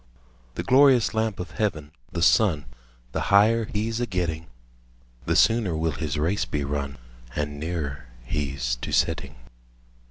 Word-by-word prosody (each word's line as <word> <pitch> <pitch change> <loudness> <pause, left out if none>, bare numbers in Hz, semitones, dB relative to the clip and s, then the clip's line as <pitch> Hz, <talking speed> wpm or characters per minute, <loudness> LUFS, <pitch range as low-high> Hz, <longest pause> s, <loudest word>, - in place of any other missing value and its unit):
The - - -3
glorious 130 -3 +5
lamp 110 -2 -1
of 90 - -5
heaven, 80 -9 -2 0.2
the 85 - -1
sun, 90 -9 +4
5 - - -20 0.5
The - - -2
higher 110 +3 +4
he 105 +2 -2
's 115 - -3
a 120 - -1
getting, 85 -3 -2 0.8
The - - +2
sooner 110 -8 +3
will 80 0 0
his 75 0 -3
race 85 +7 +1
be 75 -1 -2
run, 70 0 -3 0.4
And 75 -1 -3
nearer 75 -5 -4 0.2
he 70 +1 -3
's - - -1
to - - -6
setting. 70 +1 0
80 Hz, 160 wpm, -25 LUFS, 75-105 Hz, 0.8 s, glorious